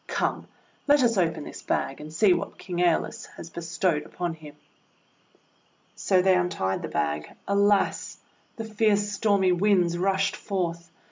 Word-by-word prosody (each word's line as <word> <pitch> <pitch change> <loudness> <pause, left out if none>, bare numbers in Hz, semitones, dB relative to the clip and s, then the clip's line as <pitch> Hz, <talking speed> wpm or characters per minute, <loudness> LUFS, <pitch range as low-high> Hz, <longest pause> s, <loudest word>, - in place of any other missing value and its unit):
Come, - - -2 0.4
let 290 -2 +5
us 230 -1 +3
open 165 -5 0
this - - -9
bag, 135 - -2
and 150 +1 -9
see 185 +4 +4
what - - -4
King 180 -2 -6
^Eolus 175 -1 0
has 165 - -9
be 170 - -6
stowed 165 -1 0
upon 175 +2 -4
him!' 150 -2 -12 1.4
So 185 -2 +2
they 190 0 +5
untied 175 - -1
the - - -4
bag. 75 0 -2 0.2
Alas! 200 0 +1 0.4
The 225 - -5
fierce 210 -1 +1
stormy 200 -2 +2
Winds 180 -2 +2
rushed 195 +1 +1
forth! 170 -4 -3
180 Hz, 150 wpm, -26 LUFS, 165-200 Hz, 1.4 s, let